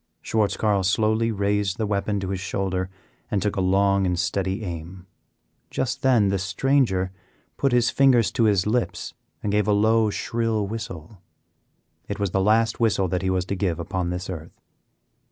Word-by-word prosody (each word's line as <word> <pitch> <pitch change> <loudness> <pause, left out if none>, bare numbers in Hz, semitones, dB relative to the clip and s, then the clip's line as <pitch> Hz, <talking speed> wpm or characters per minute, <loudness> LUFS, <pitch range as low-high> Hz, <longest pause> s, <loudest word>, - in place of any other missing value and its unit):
Schwartz 110 -2 0
Carl 105 -3 +2
slowly 110 +4 +1
raised 100 -2 0
the 110 - -1
weapon 100 0 -1
to 95 - -4
his 95 -1 -2
shoulder 95 -1 -2 0.4
and 105 - 0
took 105 +1 -1
a 95 - 0
long 100 +1 +2
and 90 -1 0
steady 95 +4 -1
aim. 90 0 -7 0.6
Just 130 - -2
then 120 -7 +4
the 100 0 0
stranger 95 -2 +1 0.4
put 140 - +1
his 120 -1 +3
fingers 125 -4 +4
to 115 - +2
his 100 -3 +3
lips 115 +3 -1 0.3
and 105 - -1
gave 105 0 +1
a 105 - +3
low, 110 +1 +3
shrill 115 0 -1
whistle. 100 -4 -7 0.9
It - - -4
was 100 -3 -1
the 95 - +1
last 110 +3 +2
whistle 105 -5 +2
that 90 +1 -1
he 95 - -1
was 95 -1 0
to 100 - -3
give 90 -3 -1
upon 85 +1 -2
this 90 +1 -4
earth. 85 -3 -8
100 Hz, 175 wpm, -24 LUFS, 95-110 Hz, 0.9 s, then